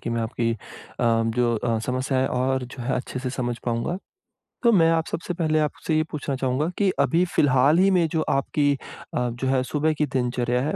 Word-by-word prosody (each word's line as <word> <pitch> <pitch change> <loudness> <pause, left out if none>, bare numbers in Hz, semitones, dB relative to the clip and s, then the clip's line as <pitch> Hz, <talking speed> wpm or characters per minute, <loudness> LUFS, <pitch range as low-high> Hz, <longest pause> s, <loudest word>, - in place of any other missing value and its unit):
कि 120 - -4
मैं 115 0 -1
आपकी 115 +1 -1
अ, - - -4 0.8
जो 120 -1 +2
अ, 115 0 0
समस्याएँ 130 +1 0
हैं 130 - 0
और 130 0 0
जो 125 0 -9
है 130 - -1
अच्छे 130 - -4
से 130 - -3
समझ 120 -2 -2
पाऊँगा। 120 +9 -1 0.7
तो 235 - +6
मैं 165 -5 +5
आप 160 -1 +1
सबसे 170 +2 -4
पहले 155 -3 +1
आपसे 155 +1 -1
ये 155 - +3
पूछना 145 -2 -3
चाहूँगा 130 +4 0
कि 200 -2 +3
अभी 170 +2 +3
फिलहाल 140 +3 +4
ही 195 - +5
में 175 -3 +3
जो 160 - +1
आपकी 145 +1 +1 0.4
अ, 125 0 0
जो 120 +3 -4
है 130 0 +2
सुबह 150 +4 0
की 150 - +2
दिनचर्या 125 0 0
है, 145 - -1
135 Hz, 210 wpm, -24 LUFS, 125-155 Hz, 0.8 s, तो